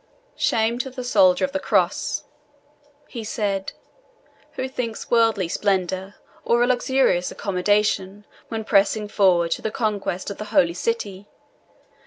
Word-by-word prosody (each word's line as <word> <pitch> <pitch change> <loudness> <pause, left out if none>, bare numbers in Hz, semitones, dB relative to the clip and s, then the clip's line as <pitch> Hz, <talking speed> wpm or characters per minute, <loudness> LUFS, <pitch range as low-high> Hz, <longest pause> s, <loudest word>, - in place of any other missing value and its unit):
"Shame 230 +1 +1
to 265 - -2
the 255 0 -7
soldier 275 +2 +4
of 275 - -6
the 290 - -2
Cross," - - 0 0.8
he 235 -3 -7
said, 200 -3 -2 0.8
"who 260 - -3
thinks 245 -4 -4
of - - -22
worldly 225 -6 +3
splendour, 190 +1 -1 0.3
or 235 +1 +3
of 245 - +1
luxurious 250 -8 +2
accommodation, 205 +1 0 0.2
when 225 -1 -4
pressing 210 0 +2
forward 180 -5 +3
to - - -1
the - - -2
conquest 205 -4 -2
of 200 - -8
the 215 - -4
Holy 170 -4 +2
City. 205 -1 -3
210 Hz, 140 wpm, -23 LUFS, 195-235 Hz, 0.8 s, soldier